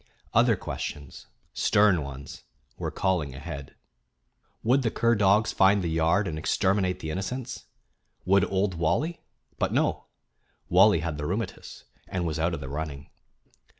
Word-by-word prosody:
Other - - +5
questions, 70 -2 -6 0.3
stern 100 -5 +3
ones, 70 0 -8 0.3
were - - -3
calling 85 -8 -1
ahead. 70 -2 -8 0.9
Would 130 +5 +3
the 120 - +1
cur 115 +1 +2
dogs 105 0 +3
find 95 0 +4
the 85 - -1
yard 80 +5 +2
and 80 -3 -3
exterminate 95 +1 +1
the 80 - -4
innocents? 120 +8 -4 0.6
Would 100 +1 +4
Old 95 0 +1
Wally 145 - -1 0.4
but - - 0
no; - - 0 0.6
Wally 95 -1 +5
had 80 -3 -3
the 75 - -3
"rheumatiz," 105 +6 -5 0.2
and 90 -2 -2
was 80 -1 -2
out 85 +1 +1
of 70 - -8
the 70 - -6
running. 70 0 -6
90 Hz, 145 wpm, -27 LUFS, 80-100 Hz, 0.9 s, Other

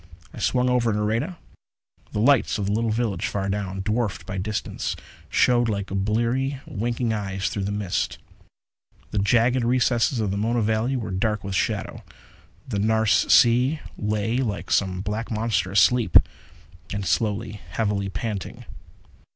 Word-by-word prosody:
I - - -9
swung 125 0 +1
over 125 -2 +2
Nareda. 110 - -1 0.7
The - - -4
lights 130 -1 +3
of 105 - -2
the 100 - -1
little 115 +2 +1
village, 110 -5 -1
far 100 -1 -2
down, 95 -1 -3
dwarfed 110 0 -1
by 95 0 -4
distance, 105 +2 -3 0.3
showed 120 -1 +3
like 100 -2 -3
bleary, 120 +7 0
winking 120 0 -2
eyes 95 -2 -2
through 100 -2 -3
the 100 - -2
mists. 100 -3 -2 0.9
The 105 - 0
jagged 120 +5 +3
recesses 120 0 +2
of 105 -3 0
the 100 - -2
Mona 115 +2 +1
valley 110 +5 0
were 115 -6 -3
dark 105 +2 -1
with 100 -1 -4
shadow. - - -2 0.6
The 105 -6 -2
Nares 110 0 +2
Sea 125 +6 +5 0.2
lay 105 +2 -1
like 110 -6 -3
some 95 -2 +1
black 105 +3 -3
monster 110 -3 0
asleep, 110 +4 +5 0.7
and 100 -1 -3
slowly, 105 +2 -1
heavily 100 0 -1
panting. 100 +1 -5
110 Hz, 145 wpm, -24 LUFS, 100-120 Hz, 0.9 s, Sea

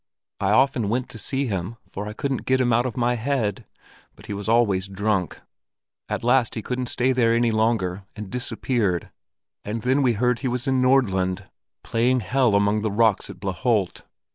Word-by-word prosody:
I 100 -1 0
often 125 -1 +3
went 125 +3 -1
to 115 - -8
see 135 +3 -1
him, 100 0 -3
for 105 +2 -6
I 105 - -5
couldn't 135 +3 -3
get 130 0 +3
him 120 -2 +2
out 120 +2 +2
of 120 - -6
my 120 0 +2
head; 120 -4 -2 0.5
but - - -15
he - - -5
was 100 +1 -4
always 100 -5 +2
drunk. 100 -3 -1 0.7
At - - -3
last 125 0 +2
he 110 - -4
couldn't 125 +1 -3
stay 130 +2 +1
there 115 -3 +3
any 120 0 +2
longer, 110 -4 0
and 105 -2 -8
disappeared, 120 -7 -1 0.5
and 105 +1 -4
then 130 +3 +2
we 125 -3 +3
heard 125 +3 +1
that - - -12
he 135 - -1
was 125 0 -2
in 130 -1 +1
Nordland, 95 -8 +2 0.4
playing 125 +2 +1
Hell 120 +2 +2
among 100 +1 +2
the 110 - 0
rocks 110 -1 +2
at - - -10
Blaaholt. 100 +1 -1
115 Hz, 190 wpm, -23 LUFS, 100-125 Hz, 0.7 s, often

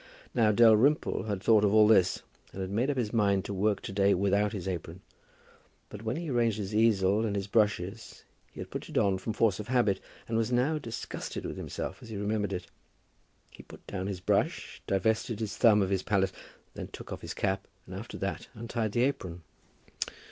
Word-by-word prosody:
Now 110 -3 +4
Dalrymple 115 +7 +4
had 100 -3 -3
thought 110 -2 +5
of 100 - +4
all 105 -1 +7
this, 95 -5 +4 0.3
and 95 - -6
had 95 0 -4
made 120 +7 +1
up 140 - -1
his 115 -3 -1
mind 100 -3 +2
to 100 - -4
work 100 +2 +1
to - - -6
day 100 0 +3
without 100 +2 +2
his 95 -3 -5
apron; 90 -1 -5 0.9
but 105 - -9
when 115 +4 -2
arranging 115 -5 +1
his 100 +2 -6
easel 105 -2 +3
and 105 -3 -1
his 100 -1 -1
brushes, 100 0 -1 0.3
he - - -13
had - - -7
put - - -6
it - - -4
on 95 -2 +2
from 110 - -3
force 110 -4 +2
of 105 - -6
habit, 120 -6 +2 0.3
and 115 - -2
was 115 +1 0
now 135 +6 +2
disgusted 115 -6 -6
with - - -4
himself - - -5
as 115 - -11
he 110 - -5
remembered 105 0 -1
it. 90 -1 -4 0.9
He - - -12
put - - -15
down 95 -1 -4
his 95 -3 -4
brush, - - 0
divested 110 +4 0
his 110 -3 -3
thumb 105 -4 +5
of 95 - -2
his 95 -1 +1
palette, 95 -2 +1 0.4
then - - -6
took - - -8
off - - -7
his - - -6
cap, 95 -1 -1 0.2
and 95 - -10
after 105 +5 -7
that 95 - -4
untied 115 -1 -3
the 120 - +2
apron. 90 -11 -2
105 Hz, 205 wpm, -29 LUFS, 95-115 Hz, 0.9 s, all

